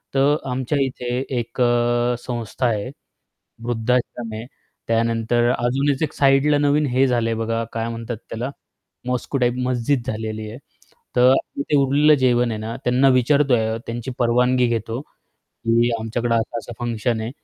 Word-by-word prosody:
तर 140 +2 +4 0.2
आमच्या 130 +3 -1
इथे 125 -2 -3 0.2
एक 120 +2 -5
अ, 120 0 +2
संस्था 120 0 -4
आहे, 110 +1 -1 0.7
वृद्धाश्रम 120 -1 -1
आहे. 110 +2 -6 0.4
त्यानंतर 115 +1 +1
अजूनच 135 +4 0
एक - - -2
साइडला 140 +1 +3
नवीन 145 +1 +2
हे 130 +2 +3
झालंय 115 -2 +1
बघा 115 0 -1
काय 115 0 -2
म्हणतात 115 0 -5
त्याला 120 +4 -3 0.6
मॉस्क्यु 125 +2 -2
टाइप 120 -1 +2
मस्जिद 125 +1 0
झालेली 110 -1 -4
आहे. 115 - -8 0.6
तर 125 +1 +6 0.3
ते 145 - 0
उरलेलं 145 +3 +4
जेवण 120 -2 +2
आहे 110 - -4
ना, 110 +1 -5
त्यांना 130 +2 +4
विचारतोय 125 -4 +2
त्यांची 120 +2 -4
परवानगी 125 +1 +3
घेतो 115 +1 -2 0.5
की, 115 +1 0
"आमच्याकडे 115 +1 -1
असा-असा 115 +1 -3
फंक्शन 115 -1 -1
आहे 110 +2 -4
120 Hz, 140 wpm, -21 LUFS, 115-130 Hz, 0.7 s, तर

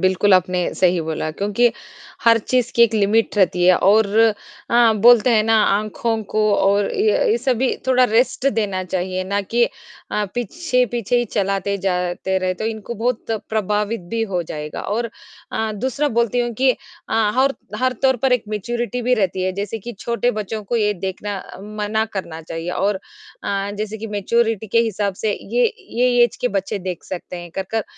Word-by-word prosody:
बिल्कुल 190 +1 +3
आपने 185 0 +2
सही 180 -1 +2
बोला 160 -1 -3
क्योंकि 205 +8 +1 0.5
हर 230 0 +6
चीज़ 245 +2 0
की 235 - +5
एक 230 -1 +4
लिमिट 215 +1 +2
रहती 180 -3 +3
है 185 - +7
और 215 +2 +4 0.6
हाँ, 235 -2 +5
बोलते 240 +1 +6
हैं 220 -2 +4
ना 225 0 +3
आँखों 215 +2 0
को 215 - +1 0.2
और 200 +1 +2
ये 425 +3 +2
ये 445 - +3
सभी 260 - +1
थोड़ा 255 -1 +4
रेस्ट 245 +3 +1
देना 200 -4 -1
चाहिए 185 +1 -2
ना 200 +2 -1
कि 235 +4 +1
अ, 210 -2 -6
पीछे-पीछे 245 - 0
ही 240 - +1
चलाते 200 -2 -1
जाते 180 0 -1
रहे 185 0 -1
तो 200 - -5
इनको 225 +1 -5
बहुत 235 +1 -2 0.2
प्रभावित 210 +1 -1
भी 230 0 0
हो 175 -1 0
जाएगा 150 -1 -6
और 230 +3 -2 0.4
अ, 220 -1 -1
दूसरा 260 +7 -1
बोलती 235 +1 +1
हूँ 240 0 -1
कि 265 0 +5
अ, - - -1 0.6
हर 270 +1 +3 0.2
हर 255 0 +1
तौर 265 -1 +4
पर 265 -1 +3
एक 250 -3 +1
मैच्योरिटी 240 +3 -3
भी 250 +1 +3
रहती 190 -4 0
है 185 0 0
जैसे 200 +3 -4
कि 240 +4 -7
छोटे 235 +1 0
बच्चों 215 -1 -4
को 235 +4 -1
ये 210 -2 +2
देखना 195 +1 -4 0.4
मना 215 +1 0
करना 170 -5 -5
चाहिए 165 +2 -5
और 195 +2 0 0.5
अ, 200 0 -1
जैसे 215 0 -3
कि 225 - -5
मैच्योरिटी 225 +1 +1
के 225 +3 +2
हिसाब 205 -3 -1
से 215 - +2 0.2
ये - - +3 0.3
ये 245 -1 +4
ऐज 240 - -3
के 250 - +1
बच्चे 195 +1 -4
देख 180 -2 -5
सकते 180 0 -6
हैं 175 -1 -9
कर-कर, 195 +3 -2
215 Hz, 180 wpm, -20 LUFS, 190-240 Hz, 0.6 s, है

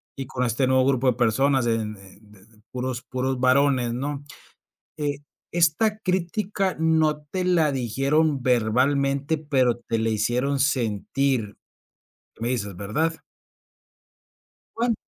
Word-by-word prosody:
y 135 - -5
con 125 0 -2
este 120 +3 +1
nuevo 130 0 +3
grupo 135 -1 +1
de 125 - +4
personas 125 +2 +2
en 110 -2 -1
en 100 +2 -17
de 100 0 -19 0.2
puros 125 -1 -4
puros 130 0 -2
varones, 130 -2 +3
¿no?, 140 +3 -4 0.7
eh, 145 -2 -2 0.3
esta 175 +6 +2
crítica 190 0 -1
no 160 -2 +2
te 185 +4 -2
la 170 -4 +3
dijeron 135 +4 +1
verbalmente, 135 +5 +1
pero 135 -6 +1
te 115 -1 -3
la 115 - 0
hicieron 120 +6 0
sentir, 125 -2 0 0.8
me 115 - -1
dices, 105 -6 -2
¿verdad? 150 - -1 1.6
Bueno. 235 0 +1
130 Hz, 125 wpm, -24 LUFS, 120-150 Hz, 1.6 s, de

